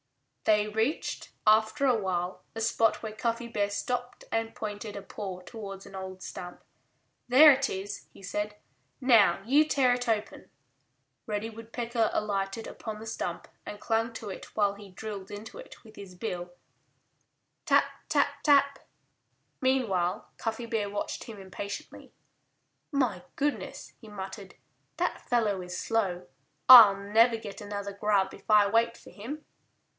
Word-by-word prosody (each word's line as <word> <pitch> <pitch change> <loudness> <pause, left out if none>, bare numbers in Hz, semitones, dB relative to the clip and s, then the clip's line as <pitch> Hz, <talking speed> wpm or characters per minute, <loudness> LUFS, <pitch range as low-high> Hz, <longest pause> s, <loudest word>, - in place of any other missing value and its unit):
They 210 -1 +4
reached, 220 +8 -2 0.2
after 220 +6 +4
a 255 -3 +4
while, 185 -3 -2
a 225 - -4
spot 225 0 +2
where 220 -1 -5
Cuffy 230 +2 -2
Bear 205 -3 -1
stopped 245 +4 -3
and 225 0 -1
pointed 210 0 -5
a - - -5
paw 190 -3 -6
towards 195 -1 -8
an - - -13
old 190 -1 -7
stump. 180 0 -8 0.7
"There 295 +5 +9
it 275 0 +1
is," 195 +1 -5
he - - -16
said. 210 +2 -3 0.4
"Now 210 -8 +5
you 285 +6 +5
tear 270 -5 +3
it 245 -1 -2
open." 215 -2 -2 0.8
Reddy 215 +1 -3
Woodpecker 230 0 -2
alighted 200 +1 -2
upon 215 -1 -7
the 220 - -9
stump 225 - -4 0.2
and 205 - -6
clung 225 +2 0
to 220 -2 -7
it - - -10
while 205 -2 +2
he 200 0 -12
drilled 195 0 -7
into 215 - -8
it - - -12
with 220 -2 -16
his 195 -3 -10
bill, 180 -2 -4 1.1
tap, - - +5 0.2
tap, 285 -1 +1
tap! 280 -1 +4 0.8
Meanwhile 220 -10 0
Cuffy 225 +1 -3
Bear 220 -3 -1
watched 205 0 -4
him 220 -3 -9
impatiently. 195 +1 -7 0.8
"My 245 - 0
goodness!" 290 +1 -3
he 220 - -12
muttered. 195 0 -8 0.4
"That - - -1
fellow 215 -6 +1
is 180 0 -6
slow. 190 - -1 0.4
I'll 225 -6 +11
never 225 +4 +3
get 215 -3 -8
another 200 -1 -5
grub 200 -1 +1
if 195 - -15
I 210 -1 +7
wait 230 +2 +2
for - - -15
him." 280 +9 -8
215 Hz, 150 wpm, -29 LUFS, 200-235 Hz, 1.1 s, I'll